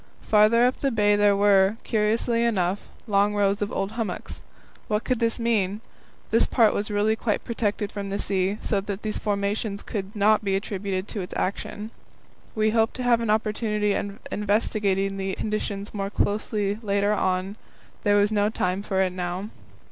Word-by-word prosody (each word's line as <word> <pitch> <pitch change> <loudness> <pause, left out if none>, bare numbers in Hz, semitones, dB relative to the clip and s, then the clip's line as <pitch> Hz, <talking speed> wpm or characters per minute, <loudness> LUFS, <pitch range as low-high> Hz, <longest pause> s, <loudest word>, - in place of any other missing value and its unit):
Farther 220 +3 +5
up 250 - +1
the 275 - +1
bay 205 -4 +3
there 205 -1 +4
were, 200 0 +4
curiously 230 +2 +1
enough, 195 -4 0 0.2
long 205 -1 +2
rows 200 0 +1
of 205 - -1
old 195 +1 -2
hummocks. 220 -5 -5 0.5
What 210 -1 0
could 255 -3 0
this 230 0 +1
mean? 210 -4 +1 0.5
This - - +4
part 230 -4 +4
was 205 +2 -2
really 210 +1 +2
quite 220 -1 -1
protected 210 -3 -2
from 200 -1 -5
the 200 - -2
sea, 195 +1 0
so 200 -2 0
that 200 0 -5
these 215 -1 -2
formations 200 0 -1
could 200 0 -5
not 210 +1 +3
be 195 -1 +1
attributed 195 -1 -3
to 205 - -4
its 180 - -7
action. 210 +3 -3 0.6
We 215 0 +2
hoped 225 0 +2
to 255 - -4
have 240 -1 +3
an 230 - -2
opportunity 210 -1 +1
of 200 0 -3
investigating 200 -2 0
the 195 0 -2
conditions 210 -1 -3
more 195 -1 -3
closely 205 0 -1
later 200 -1 +1
on; 190 0 -1 0.5
there 205 -1 +3
was 205 +1 +3
no 205 -1 +2
time 185 -3 -1
for 190 -2 0
it 185 - 0
now. 180 +2 -4
205 Hz, 175 wpm, -25 LUFS, 195-215 Hz, 0.6 s, Farther